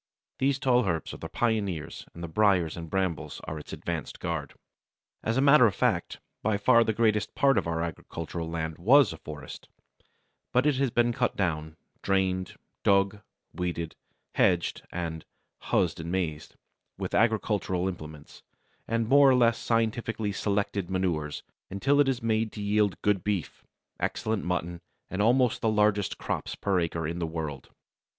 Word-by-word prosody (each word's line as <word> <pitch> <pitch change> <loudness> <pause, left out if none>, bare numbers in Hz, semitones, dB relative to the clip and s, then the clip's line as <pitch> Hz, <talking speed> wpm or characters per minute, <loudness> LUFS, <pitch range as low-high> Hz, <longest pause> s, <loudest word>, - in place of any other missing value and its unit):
These 135 0 +2
tall 125 -4 +3
herbs 85 -4 -2
are - - -7
the - - -7
pioneers, 100 -9 -2
and 85 - -8
the - - -3
briers 90 -3 +2
and 85 -1 -7
brambles 95 -5 -2
are 80 -1 -5
its 75 - -11
advanced - - -5
guard. 80 -5 -4 0.7
As 115 +3 -1
a - - +3
matter 140 -3 +7
of 100 - -2
fact, - - 0 0.2
by 110 -1 +1
far 115 +3 +5
the 110 - +1
greatest 110 -1 +1
part 135 -1 +4
of 100 -5 0
our 85 0 -1
agricultural 85 0 -5
land 80 -1 -4
was 120 - +5
a - - -9
forest, 75 -3 -9 0.8
but 125 +3 +3
it 150 -3 +3
has 135 -1 +2
been 120 0 +2
cut 125 0 0
down, 80 -4 -2 0.2
drained, 95 -2 0 0.3
dug, 100 +1 +3 0.3
weeded, 85 -2 -3 0.4
hedged, 85 -1 +2
and 80 -2 -4 0.4
"huzzed - - +1
and 85 +1 -5
maazed" 85 -5 -3 0.4
with - - -4
agricultural 105 -5 +1
implements 75 -5 -8 0.5
and 115 0 0
more 140 +2 +7
or 130 - +5
less 115 -2 +3
scientifically 115 -2 0
selected 100 -2 -1
manures, 85 -6 -1 0.3
until 135 +9 +1
it 145 -2 +5
is 125 -3 -2
made 110 -1 +1
to 105 - -6
yield 105 -2 +1
good 100 -4 +2
beef, 100 -6 -3 0.4
excellent 110 -2 -1
mutton, 85 -1 -2 0.3
and 95 - -1
almost 120 +2 +3
the 110 - +2
largest 105 -2 +2
crops - - -3
per 100 -2 0
acre 80 -2 -2
in 85 +2 -4
the 85 - -1
world. 80 -5 -5
100 Hz, 160 wpm, -28 LUFS, 85-115 Hz, 0.8 s, matter